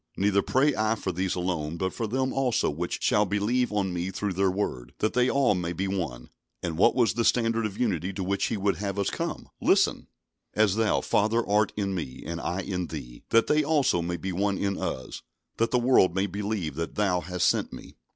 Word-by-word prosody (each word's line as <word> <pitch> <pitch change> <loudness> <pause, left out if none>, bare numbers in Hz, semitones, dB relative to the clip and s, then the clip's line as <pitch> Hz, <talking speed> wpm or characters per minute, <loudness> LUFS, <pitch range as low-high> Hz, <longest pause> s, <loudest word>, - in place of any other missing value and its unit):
Neither 100 0 +3
pray 140 +6 +2
I 110 +1 +1
for 95 -3 -3
these 90 +1 -1
alone, 85 -3 -2
but 95 +2 -2
for 115 - -3
them 130 +4 -1
also 130 - +1
which 85 +4 -4
shall 105 - +4
believe 105 +5 0
on 100 -3 -1
Me 90 +1 -2
through 100 +1 -3
their 95 +1 +2
word; 65 -11 -3
that 110 - 0
they 125 0 +3
all 135 -5 +3
may 90 -2 -2
be 95 +2 -2
one." 80 -11 -4 0.3
And 85 -2 -2
what 85 - +4
was 120 -3 +3
the 115 - 0
standard 115 -2 +2
of 100 - -10
unity 95 -6 0
to 95 0 -3
which 100 +2 0
He 110 - -1
would 100 0 0
have 100 -1 -3
us 100 - 0
come? - - -4
Listen! - - +2 0.5
"As 105 -2 +3
Thou, 110 -1 +2
Father, 115 +3 +1
art 105 0 +2
in 100 -2 -1
Me, 75 -9 -5
and 85 +1 -4
I 90 +3 -2
in 90 -2 -3
Thee; 60 -6 -8
that 115 0 +4
they 150 0 +3
also 140 - +2
may 85 +1 -2
be 95 +1 -4
one 100 +2 0
in 100 -1 -1
Us; 65 - -4 0.4
that 115 - +2
the 125 - +2
world 120 -8 +4
may 95 +1 +2
believe 100 -5 -3
that 85 0 -4
Thou 100 -4 +2
hast 90 0 -2
sent - - +1
Me." - - -11
100 Hz, 220 wpm, -27 LUFS, 90-110 Hz, 0.5 s, shall